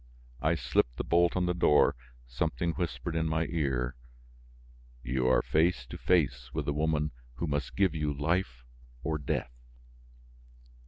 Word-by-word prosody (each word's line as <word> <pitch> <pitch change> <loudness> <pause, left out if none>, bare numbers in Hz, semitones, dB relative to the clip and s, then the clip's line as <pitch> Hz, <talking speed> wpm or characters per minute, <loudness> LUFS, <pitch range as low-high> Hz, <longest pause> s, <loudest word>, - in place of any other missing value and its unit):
I 80 +2 +2
slipped - - 0
the - - -2
bolt 85 +1 +3
on 90 - +2
the 90 - +1
door; 85 -4 +4 0.3
something 75 +6 -1
whispered 80 -2 -3
in 80 0 +1
my 80 +1 0
ear: 65 -6 -1 1.1
"You 65 +1 0
are 65 - +4
face 80 -5 +2
to - - -8
face 65 -8 +1
with - - -1
the 70 - 0
woman 75 0 0 0.2
who 85 - -2
must 75 -3 -2
give 95 -4 +3
you 75 -2 -1
life 70 -4 -1 0.4
or 80 -1 -1
death." 65 -3 -2
75 Hz, 150 wpm, -30 LUFS, 65-85 Hz, 1.1 s, door